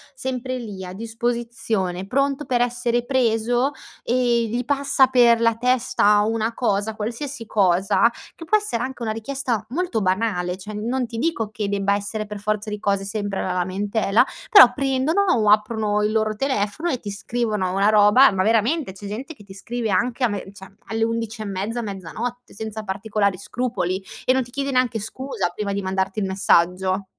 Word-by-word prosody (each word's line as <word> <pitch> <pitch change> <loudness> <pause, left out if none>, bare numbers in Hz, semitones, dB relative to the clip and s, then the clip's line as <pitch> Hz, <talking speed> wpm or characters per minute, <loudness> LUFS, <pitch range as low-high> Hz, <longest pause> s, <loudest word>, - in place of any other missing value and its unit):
sempre 255 -1 -3
lì, 205 -6 -7
a 180 - -7
disposizione, 230 -4 -2
pronto 275 +4 0
per 245 -1 +1
essere 240 0 0
preso, 245 +1 +1 0.3
e 240 -1 +1
gli 240 +2 -2
passa 280 0 +3
per 240 -3 +4
la 230 -1 +3
testa 230 -3 +3
una 220 +1 0
cosa, 215 -2 0
qualsiasi 235 +4 -4
cosa, 195 +1 +3 0.2
che 330 - -11
può 430 +6 +4
essere 415 - -2
anche 255 -1 -5
una 220 - -1
richiesta 235 0 -2
molto 295 -4 -1
banale, 185 -2 0
cioè, 210 +3 -9
non 240 +5 -2
ti 230 -1 -6
dico 235 -8 -1
che 210 -2 -3
debba 200 0 +1
essere 205 +1 -2
per 210 0 -7
forza 210 +1 -2
di 210 - -4
cose 200 -1 0
sempre 200 -1 -3
la 185 - -2
lamentela, 200 +5 +1 0.2
però 255 - +9
prendono, 275 +6 +1
o 215 -3 +3
aprono 210 0 +2
il 210 +1 +1
loro 215 -1 0
telefono, 260 +5 -1
e 255 -6 -1
ti 205 - -6
scrivono 215 -2 -2
una 195 +2 +3
roba, 215 +5 +6
ma, 190 -1 0
veramente 225 - +1
c'è 195 +2 -11
gente 250 +10 -6
che 210 - -16
ti 195 -1 -12
scrive 225 +3 -4
anche 250 +3 0
a - - +5
me 205 -3 -4
cioè, 195 -1 -13
alle 225 +2 -1
11 225 -1 -2
e - - -7
mezza, 205 +4 -3
mezzanotte, 220 +5 -6
senza 220 0 -5
particolari 200 -1 -1
scrupoli, 195 -4 -2 0.2
e 255 - +4
non 260 - +2
ti 245 -1 -9
chiede 280 0 -1
neanche 250 -3 +1
scusa 220 -2 -3
prima 200 +1 -3
di 200 - -2
mandarti 190 +1 -2
il 200 - 0
messaggio. 190 0 +2
220 Hz, 180 wpm, -22 LUFS, 200-245 Hz, 0.3 s, però